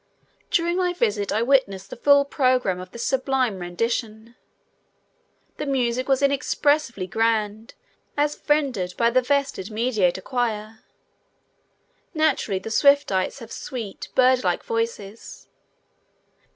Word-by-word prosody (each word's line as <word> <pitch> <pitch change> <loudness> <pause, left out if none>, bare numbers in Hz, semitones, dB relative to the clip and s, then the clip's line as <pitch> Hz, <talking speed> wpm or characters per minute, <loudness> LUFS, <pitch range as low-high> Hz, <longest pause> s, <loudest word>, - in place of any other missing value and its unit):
During 345 +1 +1
my 360 -1 +1
visit 210 - 0
I 215 +3 +1
witnessed 215 -8 +1
the - - -5
full 280 +2 +4
program 255 -9 +1
of 185 0 -9
this 235 +4 -7
sublime 260 -6 0
rendition. 220 +5 -3 1.2
The 300 - -4
music 255 -1 0
was 270 +1 +2
inexpressibly 280 -5 +1
grand 220 +2 -1 0.4
as 295 +1 0
rendered 250 -12 +1
by 235 0 +3
the 255 +1 +3
vested 270 -7 -1
Mediator 215 -5 0
Choir. 220 -3 -3 1.4
Naturally 295 -10 +1
the 210 +4 -6
Swiftites 280 -5 +2
have 230 - -10
sweet, 235 -7 -6
bird 255 -1 +4
like 180 -2 0
voices. 230 -2 -5
235 Hz, 115 wpm, -23 LUFS, 210-275 Hz, 1.4 s, full